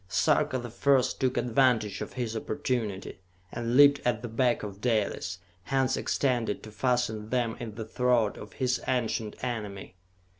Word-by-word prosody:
Sarka 130 - +2
the 120 -2 -6
First 135 +1 +2
took 130 -1 +1
advantage 120 -4 +2
of - - -5
his 120 -3 -3
opportunity, 115 -7 -3 0.3
and 120 +1 -1
leaped 145 0 +7
at 120 -2 0
the - - -3
back 120 +1 +1
of 100 -1 -7
Dalis, 105 -6 0 0.3
hands 135 -1 +1
extended 120 -6 0
to 110 - -9
fasten 110 -2 0
them 120 -2 0
in 110 -3 -6
the 110 -1 -5
throat 120 -1 +1
of 105 - -10
his 125 -1 0
ancient 115 -3 -1
enemy. 105 -7 -4
120 Hz, 155 wpm, -28 LUFS, 110-125 Hz, 0.3 s, leaped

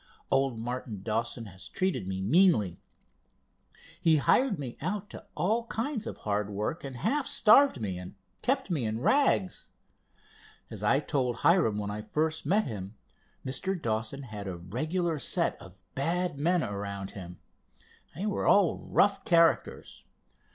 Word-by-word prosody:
Old 135 -3 +2
Martin 115 -3 -5
Dawson 115 +2 -2
has 95 -2 -10
treated 185 - -1
me 95 0 -3
meanly. 110 - +3 1.2
He 160 -1 +5
hired 220 - +3
me 130 -5 -6
out 200 +5 -3
to - - -9
all 220 +9 0
kinds 230 0 -3
of - - -6
hard 105 0 -2
work, 105 - -3
and 135 -2 -6
half 275 - 0
starved 255 - +5
me, 95 -5 -3
and 90 +2 -9 0.3
kept 255 -6 0
me 150 -7 0
in 110 0 -2
rags. 200 - +2 1.0
As 105 - -6
I 135 +7 +3
told 130 -6 -1
Hiram 165 - +4
when 105 -1 -3
I 105 +1 -4
first 155 +5 -2
met 205 +6 +3
him, 100 - -6 0.5
Mr. 185 +8 -2
Dawson 115 +3 -3
had 105 -5 -7
a 90 -2 -4
regular 155 - -2
set - - 0
of 95 0 -14
bad 170 +4 -1
men 170 +4 +1
around 100 -1 -5
him. 90 -3 -9 0.8
They 190 - -4
were 210 - -1
all 200 -5 +4
rough 205 - +2
characters. 170 -5 +2
135 Hz, 150 wpm, -29 LUFS, -, 1.2 s, He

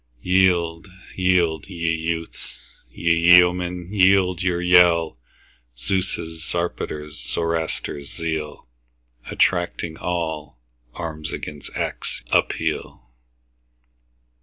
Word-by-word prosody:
Yield, 90 -2 +2 0.3
yield, 90 -4 +1
ye 85 -3 -1
youths! 80 0 -4 0.3
ye 85 +7 +1 0.2
yeomen, 90 +1 +1
yield 95 -2 +4
your 90 -1 0
yell! 90 -5 +4 0.6
Zeus', 95 +11 -1 0.3
Zarpater's, 75 -3 -4
Zoroaster's 80 -3 -3
zeal, 80 -4 -4 0.6
Attracting 85 -2 0
all, 80 -6 -3 0.4
arms 80 -3 -5
against 75 -1 -7
acts - - -4
appeal! 60 0 -1
85 Hz, 80 wpm, -22 LUFS, 80-90 Hz, 0.6 s, yield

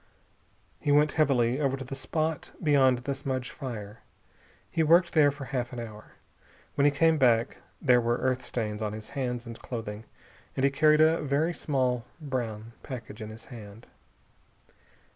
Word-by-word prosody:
He 145 - 0
went 150 +1 +5
heavily 130 -5 +2
over 135 -1 +1
to 135 - -7
the 135 - -7
spot 155 +3 -2
beyond 135 -4 +4
the 140 - -1
smudge 130 -2 -3
fire. 115 -6 -7 0.7
He 165 - +1
worked 170 +3 +4
there 150 -3 +6
for 145 -1 -6
half 125 -3 -3
an 125 - -5
hour. 110 -2 -9 0.6
When 140 - +2
he - - +7
came 160 +2 +3
back 120 -3 +3 0.2
there 125 -4 +4
were 120 +1 +1
earth 130 0 0
stains 110 -3 -3
on 105 -1 -2
his 110 0 -8
hands 125 -3 -3
and 115 -1 -8
clothing, 110 -2 -6 0.5
and 135 - 0
he 140 - +4
carried 155 +2 +4
a 160 +1 +4
very 150 +4 +1
small 130 -6 0 0.2
brown 115 -7 -4
package 115 -4 -8
in 110 - -6
his 110 +1 -11
hand. 110 0 -11
130 Hz, 165 wpm, -28 LUFS, 115-145 Hz, 0.7 s, he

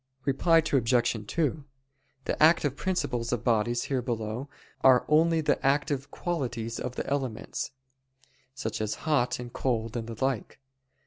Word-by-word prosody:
Reply 155 +5 +3
Obj. 120 -4 +2
2: 155 0 -1 0.6
The - - -2
active 155 -3 +5
principles 130 -10 -1
of 120 -2 -1
bodies 120 +1 +1
here 135 -2 -1
below 120 +2 -3 0.3
are 130 -2 +6
only 160 +1 +4
the 150 - 0
active 140 0 +1
qualities 120 -11 -3
of 125 0 -4
the - - -3
elements, 135 -5 -3 0.9
such 110 -5 -3
as 105 0 -1
hot 135 -6 +2
and 120 -1 -8
cold 115 -3 -1
and 115 -1 -3
the 115 +3 -2
like. 130 -7 -3
125 Hz, 140 wpm, -28 LUFS, 115-145 Hz, 0.9 s, are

